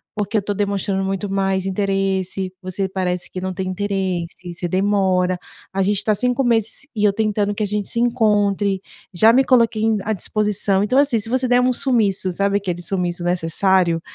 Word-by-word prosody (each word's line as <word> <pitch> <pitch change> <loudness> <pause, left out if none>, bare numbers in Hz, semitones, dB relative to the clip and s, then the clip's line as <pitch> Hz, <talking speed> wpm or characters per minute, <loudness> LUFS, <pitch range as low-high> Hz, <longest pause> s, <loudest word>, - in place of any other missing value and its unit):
porque 210 +1 -1
eu - - +2
tô 205 +1 -2
demonstrando 200 -1 -1
muito 195 +1 -2
mais 195 -1 0
interesse, 195 -1 -1
você 185 +1 -2
parece 180 -2 -2
que 185 - -5
não 185 0 -3
tem 185 +1 -4
interesse, 185 -3 -3
você 175 +1 -4
demora, 185 -1 +1 0.3
a 195 - 0
gente 200 +1 +1
tá 215 - +2
5 250 +5 0
meses 230 +2 0
e 210 -1 +1
eu 200 - +4
tentando 210 -1 0
que 215 - -2
a - - +2
gente 210 0 -3
se - - -5
encontre, 205 -5 +1 0.3
já 220 +6 +6
me 265 +2 +5
coloquei 230 -4 +3
em 220 -1 +2
à 220 - -1
disposição", 205 -1 0
então, 255 +6 +2
assim, 280 -4 +3
se 215 - -2
você 255 +1 0
der 245 0 +4
um 250 0 +2
sumiço, 210 -8 +1
sabe 200 +2 +1
aquele 180 -3 -3
sumiço 175 -1 -2
necessário? 175 0 +1
200 Hz, 190 wpm, -20 LUFS, 185-215 Hz, 0.3 s, já